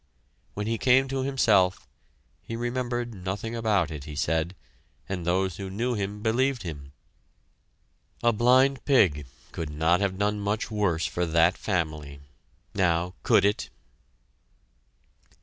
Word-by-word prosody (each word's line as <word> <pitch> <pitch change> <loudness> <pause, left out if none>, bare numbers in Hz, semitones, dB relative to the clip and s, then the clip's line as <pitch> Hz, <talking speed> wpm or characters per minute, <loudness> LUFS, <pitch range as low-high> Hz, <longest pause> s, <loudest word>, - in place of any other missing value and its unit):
When 105 - -3
he 115 0 -1
came 130 +1 +4
to 135 0 -1
himself, 110 -9 +2 0.5
he 115 - -6
remembered 120 0 -2
nothing 100 +4 -4
about 105 -8 +1
it, 75 -3 -7
he 75 -1 -8
said, 80 +4 -1 0.5
and 90 -3 -4
those 95 0 0
who 95 -1 -5
knew 120 +6 -1
him 105 -1 -4
believed 125 +2 +1
him. 70 -5 -7 1.3
A 120 0 +4
blind 130 +4 +3
pig 85 - +3 0.2
could 80 -2 -5
not 80 +4 +2
have 100 -2 -1
done 105 +1 0
much 105 +3 -2
worse 100 -6 0
for 90 0 -1
that 85 +2 +3
family! 75 -7 -3 0.5
Now, 90 -2 +1
could - - +4
it? 105 +1 0
100 Hz, 130 wpm, -26 LUFS, 85-115 Hz, 1.3 s, came